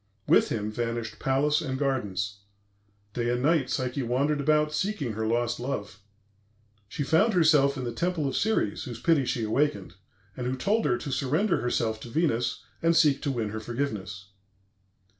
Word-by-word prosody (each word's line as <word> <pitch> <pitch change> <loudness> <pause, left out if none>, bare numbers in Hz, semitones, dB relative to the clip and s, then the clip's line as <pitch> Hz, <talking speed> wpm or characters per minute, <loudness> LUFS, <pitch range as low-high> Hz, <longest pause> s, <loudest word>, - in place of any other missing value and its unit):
With - - +4
him 105 -1 -2
vanished 115 -1 -3
palace 145 +3 +2
and 130 -4 -3
gardens. 100 -8 -2 0.7
Day 120 -1 -1
and 120 +1 0
night 150 -4 +2
Psyche 130 +1 -1
wandered 140 +5 0
about 150 +1 +2
seeking 150 - -1
her 110 +1 -2
lost 120 +1 0
love. 115 -5 -4 0.9
She 145 - -3
found 190 +9 +3
herself 150 -5 +4
in 130 - -4
the 120 -1 -3
temple 170 +1 -1
of 135 - -3
Ceres, 215 - 0
whose 120 -3 -7
pity 160 -6 +3
she 120 -2 -1
awakened, 145 +7 0 0.4
and 125 -1 -4
who 130 - -1
told 210 - +1
her 120 - +2
to 140 - -6
surrender 150 - +1
herself 115 -2 -1
to 120 - -9
Venus 120 -5 0 0.2
and 165 0 +3
seek 150 -4 +4
to 145 - -1
win 115 -5 -2
her 110 +1 -4
forgiveness. 105 -5 -4
130 Hz, 170 wpm, -27 LUFS, 115-150 Hz, 0.9 s, With